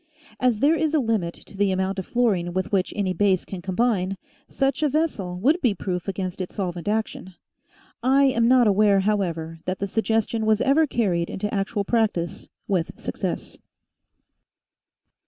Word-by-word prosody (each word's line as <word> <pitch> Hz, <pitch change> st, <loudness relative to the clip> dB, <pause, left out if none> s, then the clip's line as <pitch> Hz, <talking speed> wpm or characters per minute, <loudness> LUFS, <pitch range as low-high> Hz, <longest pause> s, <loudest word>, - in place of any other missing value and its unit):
As 250 Hz, -3 st, +2 dB
there 295 Hz, +3 st, +5 dB
is 315 Hz, -1 st, +1 dB
a -, -, +4 dB
limit 220 Hz, -9 st, -1 dB
to -, -, -15 dB
the 200 Hz, 0 st, +2 dB
amount 190 Hz, +1 st, -1 dB
of 190 Hz, -, -6 dB
fluorine 200 Hz, -8 st, +1 dB
with 185 Hz, 0 st, -2 dB
which 195 Hz, -2 st, +1 dB
any 195 Hz, -3 st, 0 dB
base 190 Hz, 0 st, +2 dB
can 190 Hz, -2 st, -7 dB
combine, 195 Hz, 0 st, 0 dB, 0.3 s
such 275 Hz, +1 st, 0 dB
a 300 Hz, -, +3 dB
vessel 255 Hz, -, -1 dB
would 300 Hz, -, +2 dB
be 235 Hz, -7 st, +2 dB
proof 180 Hz, -1 st, -4 dB
against 190 Hz, -1 st, -3 dB
its 185 Hz, -, -6 dB
solvent 180 Hz, -3 st, -4 dB
action. 210 Hz, -3 st, -2 dB, 0.7 s
I 265 Hz, +3 st, +4 dB
am 235 Hz, -4 st, +3 dB
not 250 Hz, -1 st, +5 dB
aware, 205 Hz, -1 st, +4 dB
however, 170 Hz, -6 st, -1 dB
that 185 Hz, 0 st, -2 dB
the 200 Hz, -, -3 dB
suggestion 225 Hz, +1 st, 0 dB
was 215 Hz, -1 st, +3 dB
ever 295 Hz, +5 st, +3 dB
carried 185 Hz, -10 st, 0 dB
into 210 Hz, +2 st, -4 dB
actual 200 Hz, +1 st, -1 dB
practice 205 Hz, -7 st, -1 dB, 0.2 s
with 180 Hz, -4 st, -1 dB
success. -, -, -4 dB
205 Hz, 165 wpm, -24 LUFS, 185-235 Hz, 0.7 s, there